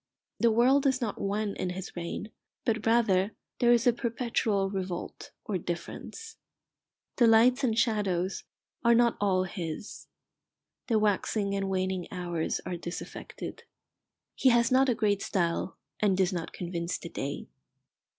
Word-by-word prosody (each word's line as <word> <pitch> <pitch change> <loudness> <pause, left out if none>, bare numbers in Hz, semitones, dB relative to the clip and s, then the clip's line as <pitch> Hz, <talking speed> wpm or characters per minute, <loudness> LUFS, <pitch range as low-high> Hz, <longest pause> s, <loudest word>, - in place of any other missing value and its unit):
The 235 - +5
world 255 +5 +4
is 265 -1 +2
not 230 -5 -3
one 205 +1 -1
in 185 - -2
his 185 +1 -6
reign, 175 +5 -5 0.3
but 225 -1 0
rather 215 -4 +3 0.3
there 240 -1 +5
is 235 -1 +4
a 245 - +5
perpetual 230 -4 0
revolt 185 -3 -5 0.2
or 195 -4 -1
difference. 450 - -6 0.8
The 240 - +6
lights 240 +4 +5
and 225 -4 +1
shadows 195 -6 +1 0.4
are 235 0 +6
not 235 0 +4
all 190 -2 +3
his. 175 0 -6 0.8
The 225 - +3
waxing 205 -1 +1
and 195 -1 -1
waning 185 -2 -1
hours 175 -3 -2
are 180 -1 -3
disaffected. 170 +1 -7 0.7
He 265 - +4
has 235 -1 +4
not 265 +1 +5
a 245 - +2
great 205 -2 +1
style, 175 -1 -1 0.2
and 200 -3 +2
does 190 0 +2
not 170 -2 -4
convince 170 -1 -3
the 170 - -8
day. 140 -2 -4
205 Hz, 145 wpm, -29 LUFS, 185-235 Hz, 0.8 s, The